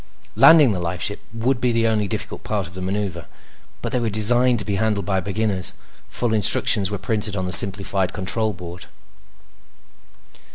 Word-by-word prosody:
Landing 150 -7 +6
the 95 - -3
lifeship 90 +4 -3
would 120 +3 -2
be 125 0 +1
the 115 0 0
only 110 -2 0
difficult - - -6
part 105 -3 -3
of 85 - -11
the 95 - -8
maneuver, 95 -3 -4 0.6
but - - -3
they 125 - 0
were 115 -2 -1
designed 120 +4 +3
to 105 - -4
be 100 -2 -2
handled 105 -1 -1
by 95 -2 0
beginners. 100 0 -2 0.3
Full 120 -2 -2
instructions 105 -1 +3
were 105 - -4
printed 105 +1 -1
on 95 -2 -3
the 90 - -4
simplified 95 0 +2
control 110 +3 -2
board. 90 -2 -10
105 Hz, 170 wpm, -21 LUFS, 95-110 Hz, 0.6 s, Landing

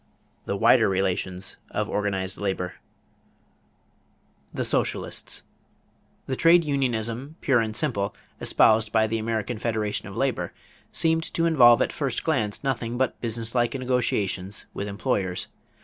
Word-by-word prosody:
THE - - -2
WIDER - - +5
RELATIONS 95 0 -1
OF 105 0 -2
ORGANIZED 100 -3 -2
LABOR 95 -3 -2 1.8
=The - - -3
Socialists.= - - -1 0.8
The 130 - -2
trade 170 +4 +5
unionism 130 -1 -1
"pure 130 -4 +3
and 110 -1 -2
simple," 115 -11 0 0.2
espoused 110 -1 +4
by 110 -1 +3
the 110 +1 -1
American 110 0 -2
Federation 110 -3 -2
of - - -8
Labor, - - -1 0.4
seemed 165 0 +1
to 165 - +2
involve 125 -8 +6
at - - -3
first 135 -7 -2
glance 120 -10 -1
nothing 120 -3 -2
but 130 0 -1
businesslike 115 +2 -1
negotiations 105 -7 -1
with 100 - -4
employers. 100 -3 -1
115 Hz, 125 wpm, -25 LUFS, 100-130 Hz, 1.8 s, involve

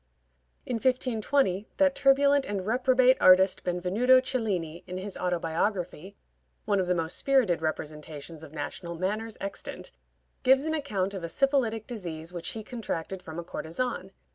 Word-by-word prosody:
In 245 - -2
1520, 235 -4 +1
that 285 -1 +4
turbulent 280 0 +4
and 200 -2 -3
reprobate 255 +3 +4
artist 185 +1 +6
Benvenuto 185 +9 +3
Cellini, 200 -11 -2
in 180 0 -5
his 195 +1 -5
autobiography 180 +1 -2 0.5
(one 205 -2 +2
of 185 - 0
the 180 - +2
most 165 -1 -2
spirited 250 -12 +2
representations 155 0 -5
of 150 - -11
national 165 +3 -5
manners 210 +5 -3
extant) 195 - -6 0.5
gives 265 +1 +5
an 315 - -1
account 205 -11 -1
of 190 -3 -6
a 170 - -3
syphilitic 240 - +1
disease 175 -7 -6
which 170 -2 -3
he 220 - -6
contracted 195 -6 -5
from 160 -1 -9
a 170 - -4
courtesan. 190 +4 -4
195 Hz, 145 wpm, -28 LUFS, 170-255 Hz, 0.5 s, artist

